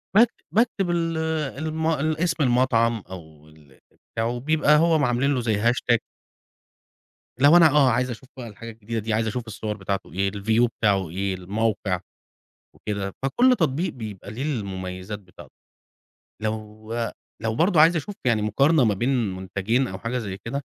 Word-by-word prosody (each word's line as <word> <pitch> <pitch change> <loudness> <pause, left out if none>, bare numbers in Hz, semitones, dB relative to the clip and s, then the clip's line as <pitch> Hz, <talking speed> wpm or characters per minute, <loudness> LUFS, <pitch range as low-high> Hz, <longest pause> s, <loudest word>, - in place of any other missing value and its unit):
باكت 230 +2 +6 0.2
باكتب 215 -4 +1
ال 165 -1 0 0.4
المو 160 +1 -1
اسم 155 +2 0
المطعم 120 -3 +2
أو 80 -5 -11
ال 75 -4 -21 0.3
بتاعه 115 +2 -1
بيبقى 150 +2 +3
هوعاملين 145 -5 +2
له 130 - 0
زي 115 -2 +1
hashtag 120 0 +3 1.4
لو 145 +5 +7
أنا، 165 -2 +7
آه، 145 -2 +5
عايز 125 +2 +1
أشوف 125 +2 -8
بقى 120 - -7
الحاجة 115 +2 -9
الجديدة 115 +1 -5
دي، 110 +1 -2
عايز 110 +1 +1
أشوف 115 +2 -4
الصور 105 0 -5
بتاعته، 95 -5 -4
إيه 95 +1 0
الview 110 +3 +2
بتاعه، 100 -5 +2
إيه 95 +3 -2
الموقع 100 0 -1 0.8
وكده، 100 -2 -4
فكل 240 - +3
تطبيق 160 +1 0
بيبقى 105 -5 -8
ليه 115 +5 -5
المميزات 95 -6 -4
بتاعته. 95 -3 -16 0.9
لو 110 0 -5 0.5
لو 110 0 -1
برضو 170 - +3
عايز 165 +3 +6
أشوف 170 +6 -3
يعني 115 -4 +2
مقارنة 140 +8 +3
ما 105 - +3
بين 120 +7 -1 0.3
منتجين 100 +7 -1
أو 95 - -7
حاجة 115 +4 -3
زي 100 -5 -4
كده، 140 +5 -3
115 Hz, 155 wpm, -24 LUFS, 100-145 Hz, 1.4 s, لو